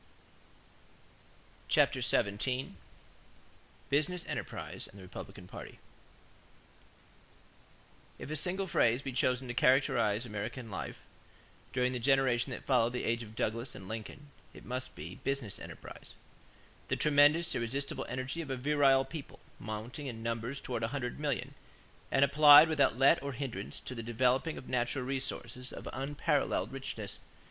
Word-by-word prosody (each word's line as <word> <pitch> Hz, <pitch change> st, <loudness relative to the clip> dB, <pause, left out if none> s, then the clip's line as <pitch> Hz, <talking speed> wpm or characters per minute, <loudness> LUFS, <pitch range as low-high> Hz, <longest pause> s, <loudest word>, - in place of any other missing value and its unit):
CHAPTER -, -, +3 dB
XVII 125 Hz, +6 st, 0 dB, 1.2 s
BUSINESS 155 Hz, +5 st, +1 dB
ENTERPRISE -, -, -5 dB
AND 100 Hz, -, -15 dB
THE 95 Hz, -, -11 dB
REPUBLICAN 95 Hz, +1 st, -9 dB
PARTY -, -, -9 dB, 2.4 s
If -, -, -7 dB
a -, -, -1 dB
single 185 Hz, +6 st, 0 dB
phrase 125 Hz, -7 st, +2 dB
be 135 Hz, -, -3 dB
chosen 125 Hz, 0 st, +1 dB
to 120 Hz, -, -3 dB
characterize 125 Hz, -4 st, +3 dB
American 110 Hz, +2 st, -5 dB
life -, -, -6 dB, 0.7 s
during 125 Hz, -1 st, +1 dB
the 125 Hz, -, -2 dB
generation 135 Hz, -1 st, +3 dB
that 130 Hz, -, -6 dB
followed 120 Hz, -3 st, +3 dB
the 125 Hz, -, -2 dB
age 115 Hz, +1 st, 0 dB
of 110 Hz, -1 st, -10 dB
Douglas 115 Hz, +3 st, -2 dB
and 95 Hz, -, -9 dB
Lincoln, 115 Hz, +7 st, -7 dB, 0.2 s
it -, -, -12 dB
must 130 Hz, +1 st, -4 dB
be 85 Hz, +5 st, -8 dB
"business 135 Hz, -7 st, -2 dB
enterprise" -, -, -10 dB, 0.7 s
the -, -, +1 dB
tremendous, 150 Hz, +3 st, +4 dB
irresistible 135 Hz, +4 st, -3 dB
energy 130 Hz, +6 st, -3 dB
of 150 Hz, -, -7 dB
a 130 Hz, -, -2 dB
virile 135 Hz, 0 st, +4 dB
people, 155 Hz, -4 st, -8 dB, 0.2 s
mounting 110 Hz, +7 st, -6 dB
in 115 Hz, -3 st, -6 dB
numbers 115 Hz, +4 st, -3 dB
toward 120 Hz, -4 st, -4 dB
a 115 Hz, -, +1 dB
hundred 125 Hz, 0 st, -4 dB
million 145 Hz, -7 st, -2 dB, 0.6 s
and 135 Hz, +1 st, +5 dB
applied 150 Hz, +2 st, +9 dB
without 145 Hz, -6 st, +3 dB
let 140 Hz, +6 st, +5 dB
or 140 Hz, -1 st, -4 dB
hindrance 115 Hz, -6 st, -5 dB
to -, -, -6 dB
the 115 Hz, -, -5 dB
developing 125 Hz, +6 st, +1 dB
of -, -, -9 dB
natural 125 Hz, +1 st, -1 dB
resources 125 Hz, -2 st, -4 dB
of -, -, -8 dB
unparalleled 145 Hz, +2 st, 0 dB
richness. 110 Hz, -7 st, -5 dB
130 Hz, 140 wpm, -32 LUFS, 115-140 Hz, 2.4 s, applied